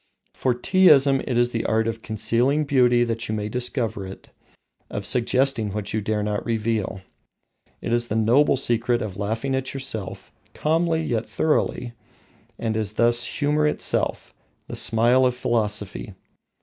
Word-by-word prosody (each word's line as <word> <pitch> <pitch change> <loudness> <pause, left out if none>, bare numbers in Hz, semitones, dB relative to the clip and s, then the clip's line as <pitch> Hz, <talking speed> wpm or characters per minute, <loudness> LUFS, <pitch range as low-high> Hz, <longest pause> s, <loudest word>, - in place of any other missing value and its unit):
For 125 -2 0
Teaism 140 -3 +4
is 120 -1 +2
the 115 - -2
art 110 0 +1
of 115 0 -4
concealing 120 +7 +1
beauty 125 -4 +3
that 115 -1 -3
you 110 - -1
may 105 0 -3
discover 120 -3 -2
it, 95 - -12 0.6
of 100 - -5
suggesting 125 -2 +1
what 105 0 -4
you 110 - 0
dare 105 0 -1
not 105 0 -2
reveal. 110 -4 -2 0.8
It 115 - -2
is 120 0 +1
the 105 - -3
noble 120 +6 +3
secret 120 -2 0
of 100 -4 -6
laughing 110 +6 -2
at 130 +1 -3
yourself, 115 -8 -6 0.2
calmly 160 +1 +1
yet 115 -6 -2
thoroughly, 125 -5 -1 0.6
and 110 -1 -2
is 110 -2 -2
thus 120 +2 +3
humour 150 +1 0
itself, - - -1 0.3
the - - -6
smile 120 +3 +3
of 125 -1 +2
philosophy. 105 -4 -2
120 Hz, 150 wpm, -23 LUFS, 110-130 Hz, 0.8 s, Teaism